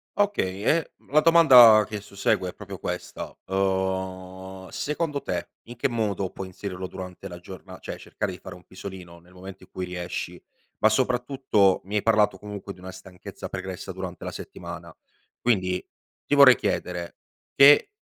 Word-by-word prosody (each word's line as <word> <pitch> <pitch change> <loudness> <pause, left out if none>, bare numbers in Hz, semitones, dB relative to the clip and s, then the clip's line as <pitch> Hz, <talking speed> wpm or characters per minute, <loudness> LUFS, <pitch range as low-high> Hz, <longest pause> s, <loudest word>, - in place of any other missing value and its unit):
Okay. 105 - 0
E 165 +6 +1 0.2
la 155 - +6
domanda 125 -10 +8
che 105 -2 -5
sussegue 100 -2 -1
è - - -9
proprio 100 -3 -9
questa. 90 0 -5
Uhm, 95 0 -2
secondo 150 -1 -2
te, - - -4
in 120 - -11
che 120 - 0
modo 100 -5 -1
puoi 95 - -7
inserirlo 95 0 -6
durante 90 +1 -8
la 90 -1 -9
giorna 95 +1 -11
cioè, - - -7
cercare - - -4
di - - -9
fare - - -10
un 90 - -16
pisolino, 95 -3 -10
nel 90 +2 -21
momento 95 +1 -11
in - - -18
cui 90 0 -5
riesci? 90 -1 -5 0.4
Ma 110 - +5
soprattutto, 125 -5 +2
mi 105 +2 -5
hai 105 - +2
parlato 105 -3 +3
comunque, 100 -1 -7
di 90 - -18
una 95 0 -8
stanchezza 95 -1 -10
pregressa 95 0 -6
durante 90 -1 -7
la - - -4
settimana, - - -9 0.4
quindi 95 -6 0 0.4
ti - - -2
vorrei 135 -3 +9
chiedere, 90 -1 -3 0.4
che 145 - +7
95 Hz, 165 wpm, -25 LUFS, 95-115 Hz, 0.4 s, vorrei